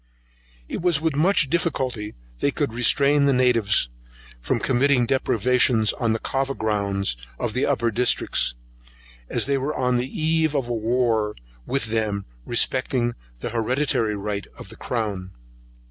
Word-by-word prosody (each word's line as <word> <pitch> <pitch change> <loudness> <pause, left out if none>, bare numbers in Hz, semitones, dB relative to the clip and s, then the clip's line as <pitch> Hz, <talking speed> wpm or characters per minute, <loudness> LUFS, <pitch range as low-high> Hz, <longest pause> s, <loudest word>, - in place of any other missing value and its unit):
It - - -4
was 175 -4 +3
with 160 -2 -1
much 160 0 +3
difficulty 130 -9 -2 0.2
they - - +2
could 140 -4 -2
restrain 140 +4 +3
the 140 - +3
natives 120 - +3 0.5
from - - -1
committing 130 0 +2
depredations 120 -2 +2
on 115 -2 -1
the 110 - +1
Cava 135 +3 -2
grounds 100 - -1 0.2
of - - -3
the - - 0
upper 115 0 +1
districts, 120 - +1 0.7
as - - +2
they 140 0 +1
were 140 +3 -2
on 125 -1 +1
the 125 +2 -2
eve 160 0 0
of 135 -4 0
a 120 - -2
war 115 -2 0 0.3
with 135 -3 0
them 105 -3 -1 0.2
respecting 120 0 0 0.3
the - - -3
hereditary 115 -1 0
right 100 0 -4
of - - -10
the - - -9
crown. 100 -6 -4
125 Hz, 145 wpm, -23 LUFS, 110-140 Hz, 0.7 s, was